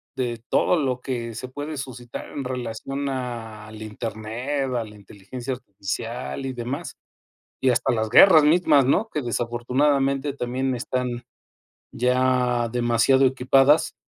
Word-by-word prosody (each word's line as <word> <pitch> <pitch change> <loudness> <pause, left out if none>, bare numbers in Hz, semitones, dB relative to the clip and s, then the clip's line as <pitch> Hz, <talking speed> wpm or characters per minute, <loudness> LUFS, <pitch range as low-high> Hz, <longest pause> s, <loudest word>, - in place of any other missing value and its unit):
de 120 -3 -3
todo 180 - +3
lo 130 -5 0
que 120 -3 -4
se 120 +4 -6
puede 145 +4 -6
suscitar 125 -3 -7
en 140 - -5
relación 130 +2 -4
al 110 -4 -6
internet, 110 +5 -4
a 120 - 0
la 105 -1 -12
inteligencia 105 +6 -7
artificial 115 +4 -5
y 130 - -2
demás, 125 +7 -5 0.7
y 130 - +4
hasta 120 - +1
las 110 -1 -1
guerras 160 - +8
mismas, 150 -3 +4
¿no? 195 - +2
Que 150 - -2
desafortunadamente 135 +4 0
también 130 +1 -2
están 125 0 -3 0.7
ya 125 -1 +1
demasiado 120 +2 +3
equipadas. 135 +3 +3
125 Hz, 130 wpm, -24 LUFS, 120-135 Hz, 0.7 s, guerras